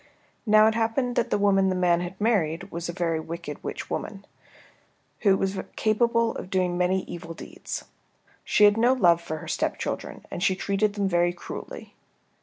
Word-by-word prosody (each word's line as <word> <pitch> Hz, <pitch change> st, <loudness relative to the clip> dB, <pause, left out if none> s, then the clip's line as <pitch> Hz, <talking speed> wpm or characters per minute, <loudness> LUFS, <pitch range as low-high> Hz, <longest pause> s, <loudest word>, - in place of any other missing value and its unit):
Now 215 Hz, 0 st, +7 dB
it 220 Hz, -, +4 dB
happened 230 Hz, +3 st, 0 dB
that 235 Hz, -, +1 dB
the -, -, +1 dB
woman 195 Hz, -1 st, +3 dB
the 185 Hz, -, 0 dB
man 175 Hz, -1 st, +2 dB
had 180 Hz, +2 st, -6 dB
married 185 Hz, -8 st, 0 dB
was 170 Hz, +1 st, -4 dB
a -, -, 0 dB
very 170 Hz, -2 st, -1 dB
wicked 160 Hz, -2 st, -7 dB
witch -, -, -5 dB
woman, 200 Hz, -1 st, -5 dB, 0.9 s
who 195 Hz, -3 st, +4 dB
was 195 Hz, 0 st, -1 dB, 0.2 s
capable 230 Hz, +1 st, +2 dB
of 185 Hz, -, -7 dB
doing 185 Hz, -2 st, 0 dB
many 180 Hz, +1 st, +1 dB
evil 165 Hz, -1 st, -8 dB
deeds. -, -, -7 dB, 0.6 s
She 210 Hz, -, +3 dB
had 205 Hz, +1 st, +6 dB
no 240 Hz, +3 st, +4 dB
love 175 Hz, -9 st, +4 dB
for 160 Hz, -2 st, -5 dB
her -, -, -9 dB
stepchildren, -, -, -3 dB
and -, -, -5 dB
she 190 Hz, 0 st, +2 dB
treated 200 Hz, +2 st, 0 dB
them 200 Hz, -2 st, 0 dB
very 175 Hz, -1 st, +2 dB
cruelly. 175 Hz, -, -9 dB
190 Hz, 180 wpm, -26 LUFS, 175-215 Hz, 0.9 s, Now